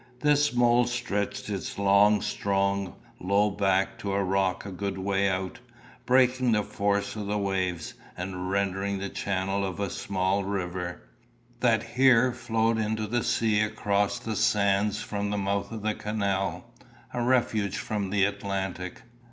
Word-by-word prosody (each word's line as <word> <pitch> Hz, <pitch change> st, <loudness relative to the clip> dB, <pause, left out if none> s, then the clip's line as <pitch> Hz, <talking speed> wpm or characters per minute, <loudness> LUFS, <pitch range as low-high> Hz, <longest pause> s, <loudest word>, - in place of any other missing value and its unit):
This 145 Hz, 0 st, +3 dB
mole 120 Hz, 0 st, +4 dB
stretched 105 Hz, -4 st, -2 dB
its 100 Hz, -3 st, -4 dB
long 100 Hz, +1 st, +4 dB
strong 100 Hz, -1 st, -1 dB, 0.2 s
low 100 Hz, +3 st, +2 dB
back 95 Hz, -1 st, +1 dB
to 100 Hz, -1 st, -3 dB
a 100 Hz, 0 st, +1 dB
rock 95 Hz, 0 st, 0 dB
a 100 Hz, -, -6 dB
good 95 Hz, +1 st, -3 dB
way 100 Hz, +1 st, +1 dB
out, 95 Hz, +2 st, -3 dB, 0.5 s
breaking 125 Hz, -1 st, +4 dB
the 105 Hz, -1 st, +2 dB
force 100 Hz, +1 st, -1 dB
of 105 Hz, -2 st, -4 dB
the 105 Hz, +1 st, 0 dB
waves, 95 Hz, -4 st, -2 dB, 0.2 s
and 90 Hz, 0 st, -4 dB
rendering 100 Hz, 0 st, 0 dB
the 100 Hz, +1 st, -4 dB
channel 95 Hz, 0 st, -1 dB
of 95 Hz, -1 st, -4 dB
a 100 Hz, -2 st, -2 dB
small 95 Hz, +1 st, -1 dB
river, 90 Hz, -2 st, -4 dB, 0.6 s
that 115 Hz, -3 st, +3 dB
here 125 Hz, +1 st, +4 dB
flowed 115 Hz, -1 st, 0 dB
into 110 Hz, 0 st, -1 dB
the 120 Hz, +2 st, -1 dB
sea 110 Hz, -2 st, +2 dB
across 105 Hz, -2 st, 0 dB
the 110 Hz, -1 st, -4 dB
sands 100 Hz, 0 st, +2 dB
from 100 Hz, 0 st, -3 dB
the 105 Hz, -, -1 dB
mouth 100 Hz, +1 st, -1 dB
of 110 Hz, -2 st, -6 dB
the 110 Hz, 0 st, +1 dB
canal, 100 Hz, -2 st, -2 dB, 0.4 s
a 120 Hz, -, -1 dB
refuge 120 Hz, -5 st, +1 dB
from 105 Hz, -3 st, -3 dB
the 100 Hz, 0 st, +3 dB
Atlantic. 95 Hz, -2 st, -4 dB
100 Hz, 150 wpm, -27 LUFS, 95-110 Hz, 0.6 s, mole